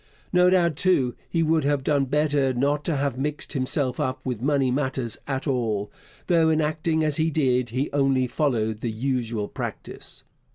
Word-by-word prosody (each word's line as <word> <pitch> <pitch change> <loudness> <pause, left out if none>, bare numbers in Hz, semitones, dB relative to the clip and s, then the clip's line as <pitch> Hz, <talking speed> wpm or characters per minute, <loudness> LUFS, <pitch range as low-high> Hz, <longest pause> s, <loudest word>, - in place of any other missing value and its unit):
No 180 0 +5
doubt, 170 -5 +2
too, 140 -10 +2 0.2
he 165 -1 +1
would 160 -1 +2
have 145 -1 +1
done 140 -1 +2
better 145 -1 +1
not 145 +4 +1
to 165 - +1
have 140 -2 -1
mixed 150 +2 -2
himself 130 -1 -1
up 130 -3 -1
with 125 -4 -3
money 135 -1 +2
matters 130 -4 -2
at 135 -1 -2
all, 115 -7 -1 0.3
though 165 -3 +3
in 160 0 +2
acting 155 +1 0
as 150 -2 0
he 160 +1 +2
did 125 -5 +1
he 130 +5 -1
only 135 -2 +2
followed 115 -5 0
the 120 - -2
usual 115 -2 -2
practice. - - -6
140 Hz, 175 wpm, -25 LUFS, 125-155 Hz, 0.3 s, No